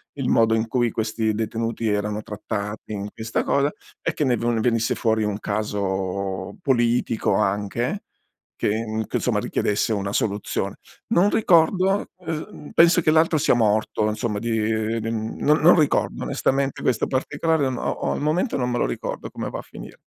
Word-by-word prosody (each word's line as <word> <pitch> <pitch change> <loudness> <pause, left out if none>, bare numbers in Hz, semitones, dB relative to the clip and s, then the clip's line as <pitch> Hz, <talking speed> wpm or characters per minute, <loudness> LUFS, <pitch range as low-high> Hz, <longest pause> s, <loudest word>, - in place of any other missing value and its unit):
il 135 -3 -2
modo 115 -1 +4
in 110 0 +1
cui 120 -1 +1
questi 110 0 -1
detenuti 115 +1 -2
erano 105 0 -1
trattati 105 0 -5
in 100 -1 -4
questa 110 0 -2
cosa 140 +1 +2 0.3
e - - -1
che 150 - 0
ne 125 -2 +3
no 120 0 0
ne 115 - 0
venisse 115 -1 +1
fuori 110 -2 +1
un 105 0 -2
caso 95 -2 -2
politico 120 -5 +1
anche 105 - -1 0.5
che 110 0 -1
che - - -6
insomma - - 0
richiedesse 105 +2 0
una 100 -1 -2
soluzione. 100 -1 -1 0.4
Non 185 +4 +5
ricordo 190 0 +3
ehm 160 -3 -6
penso 170 +1 +6
che 155 - +3
l'altro 160 0 +4
sia - - +3
morto 110 -1 +1
insomma 105 -1 -2
di 115 +2 -3
mhmm 110 0 -1
non 150 +1 +4
non 175 +2 +7
ricordo 150 - +1
onestamente 135 0 0
questo 120 -4 +1
particolare 150 +3 0
o - - -1 0.2
o - - -2
al - - -3
momento 160 - 0
non 125 -2 0
me 120 - -1
lo - - +1
ricordo - - -4
come - - -4
va - - -5
a - - -5
finire. - - -11
115 Hz, 170 wpm, -23 LUFS, 105-140 Hz, 0.5 s, non